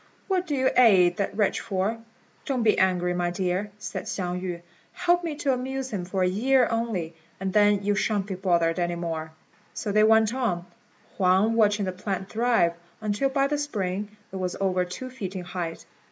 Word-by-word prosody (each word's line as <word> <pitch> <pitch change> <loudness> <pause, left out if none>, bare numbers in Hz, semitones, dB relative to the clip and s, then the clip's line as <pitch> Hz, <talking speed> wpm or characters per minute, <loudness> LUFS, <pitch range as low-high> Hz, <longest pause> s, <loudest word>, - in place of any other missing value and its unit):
what 370 -2 0
do 295 - -1
you 260 -1 +2
aid 185 -8 +6
that 200 0 -2
wretch 210 -3 +2
for?" 200 +2 -2 0.5
"Don't 255 -4 0
be 215 - +3
angry, 180 -1 +2
my 175 0 0
dear," 185 +3 -1
said 210 - -6
Hsiang 180 -1 -3
yü; 175 -2 -5 0.3
"help 350 0 +2
me 325 -3 -3
to 280 -2 0
amuse 265 +1 -3
him 190 -4 -3
for 185 +1 -1
a - - +3
year 250 +7 +3
only, 220 -8 -2 0.3
and 190 0 -3
then 205 -1 +4
you 205 +1 +2
shan't 205 -1 0
be 200 - -4
bothered 175 -2 +1
any 175 0 0
more." 165 -2 -4 0.4
So 205 - -3
they 215 +1 +4
went 220 0 +5
on, 220 -10 -1 0.5
Huang 190 +4 +3
watching 210 -2 +3
the 185 - -1
plant 190 +1 -4
thrive, 225 -7 +2 0.3
until 215 +5 0
by 275 0 +2
the 290 +1 0
spring 210 -6 -3
it 190 - -5
was 185 -1 -2
over 185 -2 +1
two 255 +9 -7
feet 200 -7 -6
in 185 - -4
height. 175 -2 -5
200 Hz, 195 wpm, -26 LUFS, 180-230 Hz, 0.5 s, aid